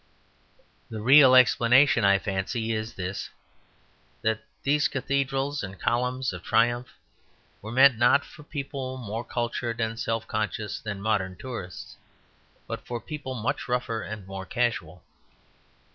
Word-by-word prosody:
The 110 Hz, -, -6 dB
real 130 Hz, +3 st, +7 dB
explanation, 125 Hz, 0 st, +5 dB
I 100 Hz, 0 st, +5 dB
fancy, 105 Hz, +4 st, -2 dB
is 110 Hz, +1 st, -3 dB
this: 95 Hz, +1 st, -4 dB, 0.9 s
that 110 Hz, 0 st, 0 dB, 0.2 s
these 145 Hz, +1 st, +3 dB
cathedrals 140 Hz, +1 st, -1 dB
and 95 Hz, -1 st, -7 dB
columns 125 Hz, 0 st, 0 dB
of 90 Hz, -, -7 dB
triumph 120 Hz, +5 st, +2 dB, 0.7 s
were 110 Hz, -, -7 dB
meant, 130 Hz, -1 st, +6 dB
not 125 Hz, +4 st, +4 dB
for -, -, -14 dB
people 135 Hz, -3 st, -5 dB
more 115 Hz, -1 st, -5 dB
cultured 120 Hz, -1 st, -3 dB
and 115 Hz, 0 st, -2 dB
self 115 Hz, -1 st, -2 dB
conscious 105 Hz, 0 st, -3 dB
than 100 Hz, -2 st, -6 dB
modern 100 Hz, -4 st, 0 dB
tourists, 115 Hz, -9 st, -8 dB, 0.7 s
but -, -, -6 dB
for 120 Hz, -1 st, -5 dB
people 145 Hz, -1 st, -6 dB
much 115 Hz, 0 st, -2 dB
rougher 120 Hz, -2 st, -1 dB
and 105 Hz, -2 st, -7 dB
more 95 Hz, 0 st, -6 dB
casual. 90 Hz, -9 st, -2 dB
115 Hz, 130 wpm, -26 LUFS, 105-130 Hz, 0.9 s, real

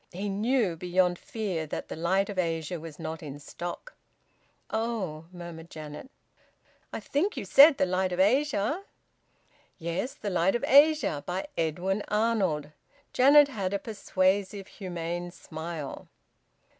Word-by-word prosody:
He 195 Hz, +3 st, -4 dB
knew 210 Hz, -1 st, +1 dB
beyond 180 Hz, +1 st, +1 dB
fear 205 Hz, -, -3 dB
that -, -, -5 dB
"The -, -, -6 dB
Light 190 Hz, +4 st, +1 dB
of 200 Hz, -3 st, -4 dB
Asia" 165 Hz, 0 st, -1 dB
was 160 Hz, -1 st, -9 dB
not 160 Hz, 0 st, -5 dB
in 145 Hz, -3 st, -7 dB
stock. 175 Hz, -, -7 dB, 0.8 s
"Oh!" 215 Hz, -9 st, -2 dB
murmured 170 Hz, -2 st, -9 dB
Janet. 155 Hz, -, -9 dB, 0.8 s
"I -, -, -4 dB
think 365 Hz, +10 st, -1 dB
you -, -, -3 dB
said 285 Hz, +1 st, +8 dB
`The -, -, +3 dB
Light 185 Hz, 0 st, 0 dB
of 180 Hz, -, -3 dB
Asia'?" 260 Hz, -, +2 dB, 1.0 s
"Yes. 170 Hz, +9 st, -3 dB
`The 205 Hz, -, -4 dB
Light 180 Hz, +3 st, +2 dB
of 240 Hz, -, -2 dB
Asia,' 280 Hz, -, +5 dB
by 180 Hz, +2 st, -2 dB
Edwin 180 Hz, +5 st, -1 dB
Arnold." 200 Hz, -9 st, 0 dB, 0.4 s
Janet 285 Hz, +3 st, +7 dB
had 200 Hz, -7 st, -2 dB
a -, -, +2 dB
persuasive 195 Hz, -1 st, 0 dB
humane 175 Hz, -3 st, -5 dB
smile. 160 Hz, -3 st, -7 dB
185 Hz, 135 wpm, -28 LUFS, 165-220 Hz, 1.0 s, said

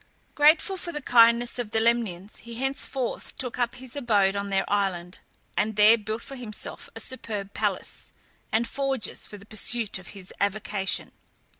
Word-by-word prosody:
Grateful 310 Hz, +6 st, +4 dB
for 345 Hz, -1 st, -4 dB
the 300 Hz, -, -3 dB
kindness 235 Hz, -1 st, +5 dB
of 240 Hz, -3 st, -2 dB
the 220 Hz, -, +1 dB
Lemnians, 220 Hz, -5 st, 0 dB
he 235 Hz, 0 st, -9 dB
henceforth 270 Hz, 0 st, -2 dB
took 250 Hz, -1 st, -5 dB
up 240 Hz, -1 st, 0 dB
his 255 Hz, 0 st, -8 dB
abode 205 Hz, -8 st, +2 dB
in 200 Hz, 0 st, -2 dB
their 195 Hz, 0 st, +1 dB
island, 185 Hz, -3 st, -1 dB, 0.4 s
and 215 Hz, 0 st, 0 dB
there 210 Hz, +2 st, +8 dB
built 220 Hz, +1 st, -4 dB
for 275 Hz, -, -8 dB
himself 230 Hz, -5 st, -6 dB
a -, -, -6 dB
superb 210 Hz, -6 st, -3 dB
palace, -, -, -2 dB, 0.4 s
and 230 Hz, +2 st, +2 dB
forges 270 Hz, -2 st, -2 dB
for 205 Hz, -, -10 dB
the 200 Hz, -, -14 dB
pursuit 215 Hz, 0 st, 0 dB
of 180 Hz, -, -13 dB
his 185 Hz, -1 st, -8 dB
avocation. 200 Hz, -1 st, 0 dB
225 Hz, 165 wpm, -26 LUFS, 200-245 Hz, 0.4 s, there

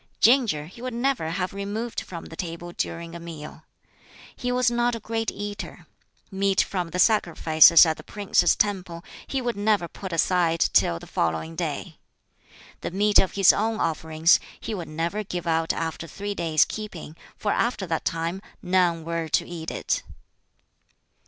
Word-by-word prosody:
Ginger 230 Hz, -, +4 dB
he 185 Hz, +9 st, -13 dB
would 250 Hz, -1 st, -4 dB
never 245 Hz, -9 st, 0 dB
have 180 Hz, +3 st, -2 dB
removed 205 Hz, +4 st, -4 dB
from 170 Hz, -3 st, -8 dB
the 165 Hz, -, -10 dB
table 170 Hz, 0 st, -6 dB
during 170 Hz, -1 st, -4 dB
a 170 Hz, -, -7 dB
meal. 160 Hz, -2 st, -9 dB, 0.7 s
He 250 Hz, -, -3 dB
was 250 Hz, -1 st, +2 dB
not 240 Hz, 0 st, +1 dB
a -, -, -5 dB
great 225 Hz, +1 st, -2 dB
eater. 205 Hz, 0 st, -7 dB, 0.5 s
Meat 195 Hz, 0 st, +1 dB
from 180 Hz, -3 st, -3 dB
the 180 Hz, -, -4 dB
sacrifices 170 Hz, -5 st, +6 dB
at 160 Hz, -1 st, 0 dB
the -, -, -11 dB
prince's 200 Hz, -3 st, +2 dB
temple 185 Hz, -5 st, -1 dB, 0.2 s
he 270 Hz, -2 st, -2 dB
would 240 Hz, -1 st, -1 dB
never 205 Hz, -3 st, +1 dB
put 190 Hz, +2 st, -8 dB
aside 170 Hz, 0 st, +2 dB
till 85 Hz, -, +3 dB
the -, -, -11 dB
following 80 Hz, 0 st, -2 dB
day. -, -, -4 dB, 0.8 s
The -, -, -4 dB
meat 205 Hz, +3 st, +4 dB
of 190 Hz, -, +1 dB
his 195 Hz, -2 st, +6 dB
own 220 Hz, +1 st, -1 dB
offerings 160 Hz, 0 st, +2 dB, 0.2 s
he -, -, -5 dB
would 175 Hz, -5 st, -5 dB
never 170 Hz, +7 st, -2 dB
give 180 Hz, -3 st, -5 dB
out 165 Hz, -1 st, +1 dB
after 165 Hz, 0 st, -4 dB
three 205 Hz, +6 st, -5 dB
days' 160 Hz, -5 st, +2 dB
keeping, 190 Hz, -8 st, -7 dB, 0.2 s
for 205 Hz, -, -1 dB
after 235 Hz, -5 st, 0 dB
that 165 Hz, -2 st, -2 dB
time 165 Hz, +3 st, -2 dB, 0.2 s
none 180 Hz, -3 st, +1 dB
were 165 Hz, -1 st, -2 dB
to -, -, +1 dB
eat 165 Hz, -2 st, -6 dB
it. -, -, -1 dB
180 Hz, 165 wpm, -25 LUFS, 165-210 Hz, 0.8 s, sacrifices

